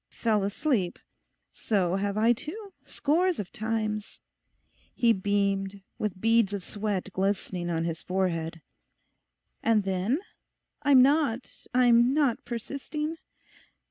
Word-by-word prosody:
"Fell 220 -3 +2
asleep," 205 - 0 0.6
so 190 -4 0
have 200 +1 -1
I 225 +2 +5
too—scores 360 - -2
of 195 -4 -5
times'; 215 -1 -3 0.8
he 235 -2 +4
beamed, 195 -1 -1 0.2
with 210 -3 -2
beads 225 -1 +3
of 200 -2 -3
sweat 205 -2 -3
glistening 190 -2 -1
on 165 -1 0
his 165 -1 -3
forehead. 165 -3 -2 1.0
'And 220 -2 +3
then? 195 +7 0 0.6
I'm 280 -3 +6
not, 275 -3 0
I'm 245 +1 +5
not 280 -6 +2
persisting? 290 +6 -4
215 Hz, 110 wpm, -28 LUFS, 195-255 Hz, 1.0 s, I'm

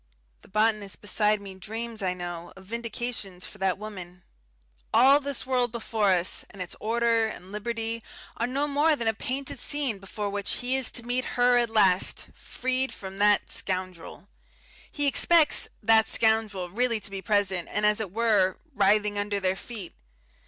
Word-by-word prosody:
The - - -18
botanist 215 -1 0
beside 210 0 +1
me 195 -1 -8
dreams, 220 +4 -6
I 185 -1 0
know, 175 -1 -6
of 190 0 -14
vindications 230 -4 -4
for - - -10
that 190 -1 +1
woman. 185 -4 -8 0.7
All 275 +3 +6
this 280 -3 -4
world 250 -2 +1
before 220 -3 0
us, 180 -1 +1
and 195 - -14
its 180 -1 -4
order 230 0 +2
and 190 -3 -9
liberty, 225 +2 -2 0.3
are 235 - -1
no 275 +3 0
more 295 +2 +3
than 235 -5 -3
a 225 - +3
painted 260 +4 -3
scene 275 -9 -2
before 200 +1 -5
which 200 0 -2
he 250 +1 +1
is 265 -3 +2
to 240 - -7
meet 245 +2 0
Her 245 0 +5
at 240 -1 +2
last, 195 -4 +3
freed 260 +1 -2
from 190 0 -9
"that 205 0 +3
scoundrel." 185 0 -4 0.6
He 290 - -2
expects 305 +2 +4 0.2
"that 220 +1 +5
scoundrel" 220 -5 +1
really 235 +1 +1
to 205 - -5
be 195 -1 -5
present 195 -4 +1
and, 210 - +1
as 210 0 +3
it 215 -4 -3
were, 210 -4 +2 0.2
writhing 205 -1 +2
under 205 0 -1
their 190 -1 0
feet.... 205 -3 -7
215 Hz, 170 wpm, -27 LUFS, 195-240 Hz, 0.7 s, All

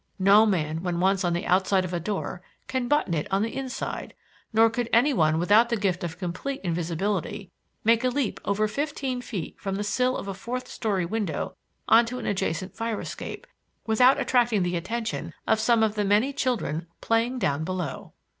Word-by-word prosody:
No 200 +3 +6
man 160 -5 0
when 175 -1 -2
once 190 +1 +2
on 175 -1 +1
the 170 - -2
outside 190 +1 +2
of 180 - -6
a 175 - 0
door 185 0 -4 0.3
can 260 -2 -1
button 295 - +2
it 150 -3 -1
on 195 +2 +2
the 225 - -3
inside, 265 -2 -4 0.4
nor 225 +1 +5
could 230 +1 -2
any 260 +6 +4
one 155 -7 +3
without 210 +7 +4
the 235 - +1
gift 190 -4 -1
of 165 -1 -4
complete 185 +10 -4
invisibility, 175 +2 -2 0.3
make 230 +2 +4
a 255 - +3
leap 260 -3 -1
of - - -4
over 210 +2 +2
fifteen 270 +1 -2
feet 210 -9 -6
from 195 -1 -3
the 205 - -2
sill 250 +5 +1
of - - -6
a 195 - -3
fourth 250 +6 -5
story 200 -6 -1
window 190 -5 -3 0.3
on 230 +1 +6
to 250 +2 -4
an - - -6
adjacent 190 -2 -2
fire 225 -1 -2
escape, - - -7 0.4
without 250 +4 +5
attracting 240 -6 +2
the 180 0 -1
attention 225 +6 -3
of 220 - +2
some 230 0 +3
of 215 -1 +2
the 210 -1 0
many 210 +7 +2
children 185 - -1
playing 230 +3 +1
down 155 - 0
below." 180 -4 -4
210 Hz, 195 wpm, -26 LUFS, 180-235 Hz, 0.4 s, No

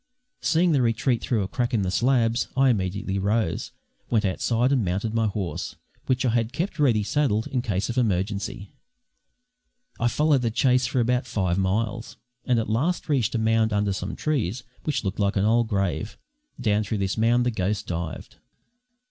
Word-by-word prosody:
Seeing 170 +2 +3
the 140 -4 +3
retreat 115 +1 +1
through 110 -5 0
a - - -3
crack 120 +3 -1
in 105 - +1
the 90 - -1
slabs, 115 +1 +2
I 135 0 +5
immediately 100 -1 -2
rose, 100 -3 0 0.4
went 110 -3 +2
outside 115 +6 +1
and 130 -5 +2
mounted 100 +5 -2
my 115 -1 +2
horse, 100 -4 -4 0.3
which 130 0 +1
I - - +3
had 115 +1 0
kept 165 +3 -3
ready 120 -8 +3
saddled 110 -3 +1
in 125 - -1
case 100 -5 -1
of 120 +1 -1
emergency. 100 -2 -2 1.3
I 120 - +2
followed 145 +1 +2
the 115 - +1
chase 125 +2 +2
for 125 0 0
about 125 +2 +1
five 95 -5 0
miles, 110 +4 -1 0.3
and 125 -2 +2
at 115 - 0
last 150 +12 -1
reached 130 -5 +1
a - - +2
mound 110 0 +2
under 100 -1 +1
some 95 +2 -4
trees, 125 - -1 0.2
which 150 -5 -1
looked 95 0 -3
like 100 0 +1
an 100 0 +2
old 115 +1 +3
grave. 100 0 -2 0.4
Down 110 -3 +1
through 110 +1 -2
this 95 -1 -1
mound 120 +2 +3
the 125 - +1
ghost 100 -1 -2
dived. 85 -4 -5
115 Hz, 180 wpm, -25 LUFS, 100-125 Hz, 1.3 s, I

